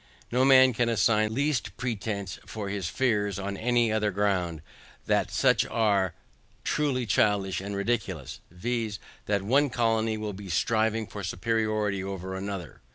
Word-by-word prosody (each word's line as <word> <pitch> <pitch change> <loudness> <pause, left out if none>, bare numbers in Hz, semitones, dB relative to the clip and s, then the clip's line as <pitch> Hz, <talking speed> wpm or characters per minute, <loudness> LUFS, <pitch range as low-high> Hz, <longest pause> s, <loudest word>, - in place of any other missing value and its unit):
No 125 +2 +3
man 130 -1 +7
can 120 +1 +1
assign 110 -1 +3
the 110 - -5
least 135 -9 -1
pretence 105 -5 -3
for 105 -3 -5
his 100 -4 -2
fears, 105 -5 0
on 100 +1 -3
any 120 +1 +2
other 110 -1 +1
grounds, 90 -5 0 0.4
that - - +1
such - - +3
as - - -9
are 100 -5 +2 0.5
truly 135 -5 0
childish 100 -2 +1
and 100 +1 -5
ridiculous, 100 - -2
viz. 110 +3 -3 0.3
that 100 -2 +1
one 140 +7 +3
colony 115 -2 +1
will 105 -1 -4
be 100 0 -9
striving 110 +6 +1
for 105 -1 -8
superiority 105 +1 0
over 95 -1 -5
another. 95 -5 -6
105 Hz, 155 wpm, -27 LUFS, 95-115 Hz, 0.5 s, man